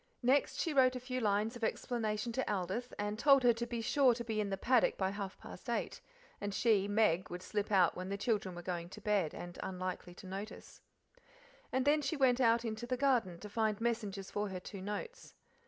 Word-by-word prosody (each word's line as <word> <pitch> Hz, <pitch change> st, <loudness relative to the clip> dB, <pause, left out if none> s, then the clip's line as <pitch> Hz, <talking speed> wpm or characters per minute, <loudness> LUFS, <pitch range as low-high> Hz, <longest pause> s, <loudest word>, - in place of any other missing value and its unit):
Next 265 Hz, +3 st, +3 dB
she 325 Hz, -, 0 dB
wrote 255 Hz, -2 st, +5 dB
a -, -, -2 dB
few 255 Hz, 0 st, -3 dB
lines 215 Hz, +1 st, +1 dB
of 240 Hz, -, -8 dB
explanation 220 Hz, -1 st, -1 dB
to 260 Hz, -1 st, -1 dB
Aldith, 200 Hz, +6 st, -2 dB
and 205 Hz, +1 st, -2 dB
told 275 Hz, -1 st, +6 dB
her 240 Hz, -1 st, +6 dB
to 235 Hz, +1 st, -4 dB
be 235 Hz, -1 st, -3 dB
sure 255 Hz, +1 st, +4 dB
to 235 Hz, -, -4 dB
be 220 Hz, -2 st, -1 dB
in 205 Hz, -, -2 dB
the 195 Hz, -, -2 dB
paddock 245 Hz, +4 st, +3 dB
by 190 Hz, -1 st, 0 dB
half 200 Hz, -1 st, -5 dB
past -, -, -10 dB
eight, -, -, -2 dB, 0.4 s
and 205 Hz, -1 st, -3 dB
she 210 Hz, -4 st, +3 dB
(Meg) 205 Hz, -4 st, +2 dB
would 180 Hz, +1 st, -6 dB
slip 210 Hz, +1 st, -2 dB
out 185 Hz, -4 st, +4 dB
when 185 Hz, +1 st, -5 dB
the 200 Hz, -, -2 dB
children 200 Hz, -4 st, -1 dB
were 175 Hz, -, -7 dB
going 175 Hz, -1 st, -4 dB
to 210 Hz, -, -10 dB
bed 205 Hz, -6 st, 0 dB
and 175 Hz, 0 st, -8 dB
unlikely 185 Hz, -1 st, -5 dB
to 190 Hz, -, -12 dB
notice. 195 Hz, +3 st, -8 dB, 0.9 s
And 260 Hz, 0 st, +1 dB
then 300 Hz, +1 st, +4 dB
she 320 Hz, +2 st, -2 dB
went 260 Hz, -2 st, +4 dB
out 230 Hz, 0 st, +4 dB
into 225 Hz, +1 st, -4 dB
the 255 Hz, +1 st, -1 dB
garden 240 Hz, -10 st, +1 dB
to 210 Hz, -, -7 dB
find 215 Hz, 0 st, 0 dB
messengers 210 Hz, -4 st, -2 dB
for 205 Hz, 0 st, -1 dB
her 185 Hz, -1 st, -4 dB
two 195 Hz, +1 st, -8 dB
notes. 210 Hz, -, -6 dB
215 Hz, 220 wpm, -34 LUFS, 195-240 Hz, 0.9 s, told